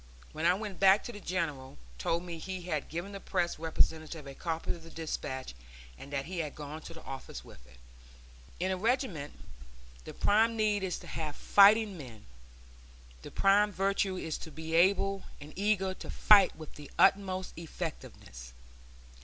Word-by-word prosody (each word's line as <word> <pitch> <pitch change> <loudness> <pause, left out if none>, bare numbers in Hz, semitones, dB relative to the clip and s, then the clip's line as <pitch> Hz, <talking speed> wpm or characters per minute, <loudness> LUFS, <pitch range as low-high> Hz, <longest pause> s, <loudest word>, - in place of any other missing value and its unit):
When 160 +2 0
I 180 - +5
went 205 -2 -6
back 195 +1 +6
the 230 -4 -7
General 155 - -3 0.2
told 165 - 0
me 170 -2 -6
he 185 +1 -5
had 155 -5 -3
given 170 +5 -5
the 200 - -6
Press 175 -4 -1
representative 160 -1 0
a 140 - -8
copy 165 +2 -3
of 170 - -6
the 165 - -12
despatch, 140 - -5 0.4
and 140 - -11
that 140 -1 -2
he 180 0 -5
had 150 -3 -3
gone 150 +1 -7
to 165 - -10
the 160 - -11
office 135 -1 -8
with 60 - -15
it." 65 -2 -18 0.8
In 185 +2 0
a 185 - -1
regiment 210 - -1 0.7
the - - -8
prime 225 +2 +3
need 210 -2 +2
is 190 -2 -2
to - - -12
have 155 -2 -4
fighting 205 -1 +5
men; 120 -6 -11 1.0
the - - -9
prime 205 +1 +4
virtue 195 0 0
is 160 -3 -4
to - - -8
be 160 +1 -7
able 195 +3 +3 0.2
and 150 +1 -11
eager 195 -1 +1
to - - -10
fight 200 -3 +6
with 155 -2 -11
the 145 -2 -11
utmost 190 -1 +3
effectiveness. 155 - -7
175 Hz, 170 wpm, -31 LUFS, 155-195 Hz, 1.0 s, back